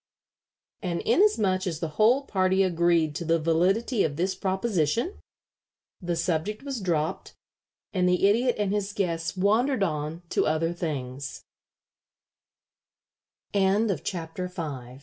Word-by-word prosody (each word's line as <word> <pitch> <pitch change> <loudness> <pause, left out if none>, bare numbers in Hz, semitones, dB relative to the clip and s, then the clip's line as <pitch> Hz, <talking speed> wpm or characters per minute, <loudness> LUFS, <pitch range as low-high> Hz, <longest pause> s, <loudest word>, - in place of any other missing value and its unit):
And 175 -3 -2
inasmuch 215 - +2
as 165 -4 -3
the 165 - -3
whole 245 +6 +5
party 190 -4 +2
agreed 170 -3 +2
to - - -4
the 165 0 +2
validity 185 - +2
of 145 -3 -1
this 185 +4 0
proposition, 190 - -1 0.8
the 175 -1 -1
subject 170 +7 -1
was 275 -5 -4
dropped, 160 -4 -2 0.6
and 180 -2 +2
the 180 +2 +3
Idiot 240 +4 +2
and 205 -1 0
his 205 -1 -2
guests 170 -3 -2
wandered 220 +5 +2
on 155 0 -3
to - - +1
other 160 +2 +1
thin 140 -6 -4
185 Hz, 110 wpm, -26 LUFS, 165-210 Hz, 0.8 s, whole